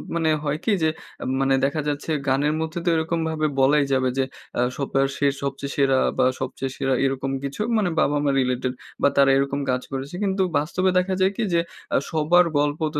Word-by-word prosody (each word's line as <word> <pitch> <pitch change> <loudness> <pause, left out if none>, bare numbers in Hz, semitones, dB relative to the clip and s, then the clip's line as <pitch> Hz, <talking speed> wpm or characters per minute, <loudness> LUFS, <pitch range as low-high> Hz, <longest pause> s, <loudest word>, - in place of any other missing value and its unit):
মানে 165 -1 +1
হয় 150 +1 -1
কি? 225 - +2
যে 160 - +4 0.3
এম - - -3
মানে 135 0 +3
দেখা 150 +2 -1
যাচ্ছে, 145 +2 -2 0.2
গানের 145 +3 +2
মধ্যে 160 +2 -3
তো - - +3
এরকম 165 +1 -1
ভাবে 155 -1 0
বলাই 140 +2 +4
যাবে 130 -1 +2
যে, 135 - +3 0.4
আ - - +3 0.2
সবপা 135 -1 0 0.2
সে 145 - +2 0.2
সবচেয়ে 140 0 -3
সেরা, 135 -2 +3 0.2
বা - - +4 0.2
সবচেয়ে 135 -1 -3
সেরা 135 -1 0
এরকম 135 0 -1
কিছু 140 +8 -4 0.2
মানে 200 -5 +1
বাবা-মা 145 -1 +2
রিলেটেড, 125 0 0 0.3
বা - - +5
তারা 135 -1 +6
এরকম 140 +1 0
কাজ 125 0 0
করেছে। 135 +5 -5
কিন্তু 190 -1 0 0.2
বাস্তবে 180 +5 0
দেখা 185 +1 +1
যায় 190 +1 +4
কি? 235 - 0
যে 170 - +4 0.4
আ - - +5
সবার 165 +3 +4
গল্প 145 +1 +1 0.2
তো - - +1
145 Hz, 205 wpm, -23 LUFS, 135-160 Hz, 0.4 s, তারা